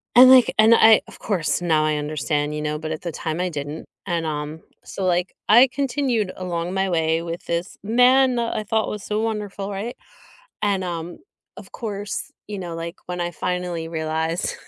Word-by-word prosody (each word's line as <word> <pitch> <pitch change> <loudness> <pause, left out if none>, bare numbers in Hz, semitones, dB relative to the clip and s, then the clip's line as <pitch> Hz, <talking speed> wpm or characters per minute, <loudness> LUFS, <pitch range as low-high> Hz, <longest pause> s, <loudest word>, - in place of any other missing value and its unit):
And, 255 +1 +10
like 255 -2 +7
and 220 +1 +7
I, 225 -1 +7
of - - -14
course, 175 -4 -1
now 155 -3 +2
I 155 -1 +1
understand, 150 0 -2
you 150 - -3
know, 150 0 -2
but 160 0 -5
at 155 - -4
the 170 - -4
time 160 +1 -4
I 180 0 0
didn't, 145 0 -6 0.2
and, 170 -3 -1
um, 150 +1 -4 0.2
so, 195 - -6
like, 180 0 0
I 240 +5 +8
continued 255 -7 0
along 175 -1 -3
my 190 0 0
way 160 -1 +1
with 170 0 -6
this 170 +2 -3
man 250 +3 +4
I 230 -2 -1
thought 220 +1 0
was 210 -2 -5
so 210 +1 -1
wonderful, 210 -3 -3
right? 205 +5 -4 0.7
And, 200 -2 +1
um, 170 -1 -5 0.4
of - - -12
course, 205 -3 -5 0.2
you 205 -2 -5
know, 175 -3 -5
like, 170 +2 -6
when 180 0 -4
I 175 - -1
finally 175 0 -3
realized 160 +1 -2
180 Hz, 190 wpm, -22 LUFS, 160-210 Hz, 0.7 s, And